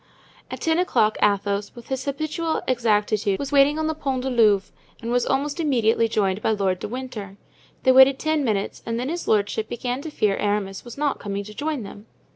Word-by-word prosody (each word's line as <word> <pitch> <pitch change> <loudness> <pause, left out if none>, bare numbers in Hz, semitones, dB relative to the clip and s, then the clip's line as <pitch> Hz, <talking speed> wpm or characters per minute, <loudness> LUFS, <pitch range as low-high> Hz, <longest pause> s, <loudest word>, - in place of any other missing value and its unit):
At - - -7
ten 325 0 +1
o'clock 215 -12 +2
Athos, 200 0 +1
with 240 -1 -12
his 265 0 -3
habitual 310 +3 -2
exactitude, 215 -4 +1
was 280 0 -5
waiting 285 +1 +4
on 315 - -1
the 315 - 0
Pont 270 -4 -3
du 265 - -2
Louvre 210 -5 +3 0.3
and 235 0 -4
was 245 0 +1
almost 290 +4 -1
immediately 230 -7 +2
joined 200 -2 0
by - - 0
Lord 195 -4 0
de - - -4
Winter. 220 -5 -7 0.5
They 260 - +5
waited 265 +1 +7
ten 310 -1 0
minutes 210 -5 -2
and 230 0 -3
then 255 +3 -2
his 340 +2 -4
lordship 215 +1 +1
began 245 +2 -3
to 315 - -6
fear 210 -9 0
Aramis 205 -2 -2
was 240 +1 -10
not 290 -1 0
coming 200 0 -4
to 210 +1 -10
join 295 +1 -3
them. 205 +2 -11
240 Hz, 205 wpm, -23 LUFS, 205-280 Hz, 0.5 s, waited